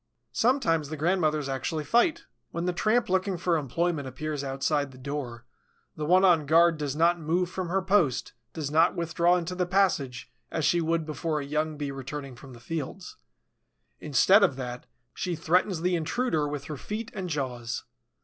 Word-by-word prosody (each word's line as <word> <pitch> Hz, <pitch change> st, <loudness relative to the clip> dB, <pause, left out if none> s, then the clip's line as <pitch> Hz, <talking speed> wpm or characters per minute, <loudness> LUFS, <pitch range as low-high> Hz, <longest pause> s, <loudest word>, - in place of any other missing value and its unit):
Sometimes 165 Hz, -, +2 dB
the 155 Hz, -, -5 dB
grandmothers 155 Hz, -3 st, +1 dB
actually 135 Hz, +4 st, -2 dB
fight. 310 Hz, -, +2 dB, 0.2 s
When 170 Hz, +1 st, -3 dB
the 180 Hz, -, 0 dB
tramp 220 Hz, +7 st, +2 dB
looking 190 Hz, 0 st, 0 dB
for 170 Hz, 0 st, +1 dB
employment 155 Hz, +1 st, -1 dB
appears 145 Hz, +3 st, -4 dB
outside 140 Hz, +1 st, 0 dB
the 130 Hz, -, -14 dB
door, 130 Hz, -3 st, -5 dB, 0.5 s
the 150 Hz, -1 st, -4 dB
one 185 Hz, +3 st, +5 dB
on 165 Hz, -6 st, +4 dB
guard 165 Hz, +1 st, +5 dB
does 145 Hz, -2 st, -2 dB
not 170 Hz, +2 st, +3 dB
move 170 Hz, +3 st, 0 dB
from 185 Hz, -2 st, -4 dB
her 190 Hz, +1 st, 0 dB
post, 185 Hz, -10 st, +1 dB, 0.2 s
does 145 Hz, 0 st, -4 dB
not 160 Hz, +2 st, +4 dB
withdraw 170 Hz, +1 st, +2 dB
into 175 Hz, +1 st, -3 dB
the 180 Hz, -1 st, -1 dB
passage, 180 Hz, -10 st, 0 dB, 0.2 s
as 160 Hz, -2 st, -1 dB
she 175 Hz, -, +3 dB
would 165 Hz, 0 st, 0 dB
before 155 Hz, 0 st, -2 dB
a 140 Hz, -, -5 dB
young 155 Hz, +1 st, -1 dB
Bee 145 Hz, -1 st, -3 dB
returning 135 Hz, 0 st, -6 dB
from 130 Hz, +1 st, -13 dB
the 120 Hz, -, -12 dB
fields. 165 Hz, +7 st, -6 dB, 0.8 s
Instead 155 Hz, -, +5 dB
of 180 Hz, -9 st, +3 dB
that, 125 Hz, -2 st, -6 dB, 0.3 s
she 180 Hz, -2 st, -3 dB
threatens 175 Hz, +2 st, +1 dB
the 180 Hz, +1 st, +1 dB
intruder 160 Hz, -1 st, 0 dB
with 145 Hz, -1 st, -4 dB
her 150 Hz, 0 st, -6 dB
feet 215 Hz, -, -5 dB
and 185 Hz, -2 st, -4 dB
jaws. 125 Hz, -6 st, -3 dB
160 Hz, 180 wpm, -27 LUFS, 145-180 Hz, 0.8 s, one